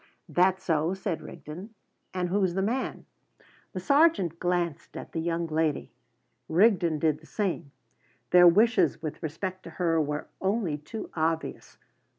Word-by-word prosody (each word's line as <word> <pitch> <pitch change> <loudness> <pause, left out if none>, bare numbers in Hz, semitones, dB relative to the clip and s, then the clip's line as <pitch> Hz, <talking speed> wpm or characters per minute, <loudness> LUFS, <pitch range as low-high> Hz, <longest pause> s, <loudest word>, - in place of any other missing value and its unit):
"That 185 +1 +3
so?" 165 0 0
said 190 -3 -3
Rigden. 185 +9 -9 0.4
"And 180 -1 -2
who's 190 -2 +1
the 190 - +1
man?" 245 +6 -2 0.7
The 185 - -3
sergeant 240 - +3
glanced 175 -3 -2
at - - -8
the 165 - -3
young 170 0 -1
lady. 160 -2 -1 0.6
Rigden 175 -3 +4
did 155 0 +1
the 160 - -18
same. 175 -8 -2 0.6
Their 175 0 +8
wishes 185 - +4
with 155 - -5
respect 185 +4 -4
to - - -7
her 165 -3 +2
were 150 0 -2 0.2
only 190 -6 0
too 215 +9 -7
obvious. 160 0 -2
175 Hz, 145 wpm, -28 LUFS, 160-190 Hz, 0.7 s, Their